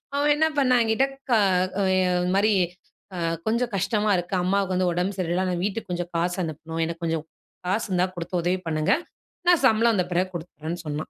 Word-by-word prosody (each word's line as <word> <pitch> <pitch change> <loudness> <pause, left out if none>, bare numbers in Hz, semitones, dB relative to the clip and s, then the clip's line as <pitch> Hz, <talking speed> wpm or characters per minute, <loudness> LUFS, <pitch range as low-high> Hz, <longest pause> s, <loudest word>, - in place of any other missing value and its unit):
அவன் 290 +1 +3
என்ன 315 +1 +3
பண்ணான் 255 -3 +4
என்கிட்ட 225 +5 +2 0.2
கா 235 - +5 0.6
எ - - +3 0.2
இது 180 0 0
மாரி 210 +2 +3 0.6
அ - - -4 0.3
கொஞ்சம் 235 +2 +1
கஷ்டமா 210 +2 +1
இருக்கு. 175 +2 -4
அம்மாவுக்கு 190 0 +1
வந்து 185 0 +2
உடம்பு 180 +3 -1
சரியில்ல. 180 +1 0
நான் 175 0 -2
வீட்டுக்கு 205 -1 -3
கொஞ்சம் 175 0 -3
காசு 175 +1 0
அனுப்பணும். 160 +1 -5
எனக்கு 165 +1 -6
கொஞ்சம் 165 -2 -1 0.4
காசு 195 +5 0
இருந்தா, 180 0 +2
குடுத்து 175 +1 -6
உதவி 180 +2 +1
பண்ணுங்க. 155 -1 +1 0.6
நான் 355 -2 +5
சம்பளம் 230 -1 +4
வந்த 180 -3 +1
பிறகு 180 +2 +1
குடுத்துறேன்னு 165 0 -6
சொன்னான். 150 +1 -4
185 Hz, 185 wpm, -25 LUFS, 170-215 Hz, 0.6 s, கா